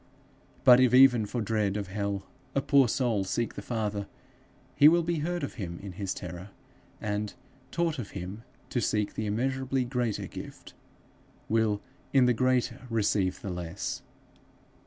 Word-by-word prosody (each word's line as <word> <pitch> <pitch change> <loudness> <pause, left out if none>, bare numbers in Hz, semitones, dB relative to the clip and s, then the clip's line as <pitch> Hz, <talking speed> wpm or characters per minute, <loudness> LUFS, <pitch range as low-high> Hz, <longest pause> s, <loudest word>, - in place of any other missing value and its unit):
But 125 0 +8
if 125 -1 +5
even 125 -5 +7
for 120 +3 -2
dread 105 -2 0
of 100 -2 -4
hell 100 -1 -2 0.3
a 140 - +3
poor 140 -3 +5
soul 120 -4 +1
seek 115 +4 -2
the - - -6
Father, 105 -4 -2 0.7
he 145 - +8
will 170 +2 +5
be 170 -1 -1
heard 175 +2 -2
of 140 - -3
him 85 -2 -4
in 100 +1 -8
his 95 +1 -4
terror, 90 +1 -7 0.5
and, 105 0 -3 0.3
taught 165 -2 -1
of 110 - -5
him 95 +4 -6 0.3
to 120 - 0
seek 105 -2 0
the 110 - -3
immeasurably 130 +4 0
greater 120 -4 -1
gift, - - -9 0.7
will 110 -2 +1 0.3
in 135 -2 +6
the 125 - +4
greater 125 0 0
receive 105 -4 +1
the 100 - -4
less. 90 0 -4
110 Hz, 155 wpm, -29 LUFS, 100-130 Hz, 0.7 s, But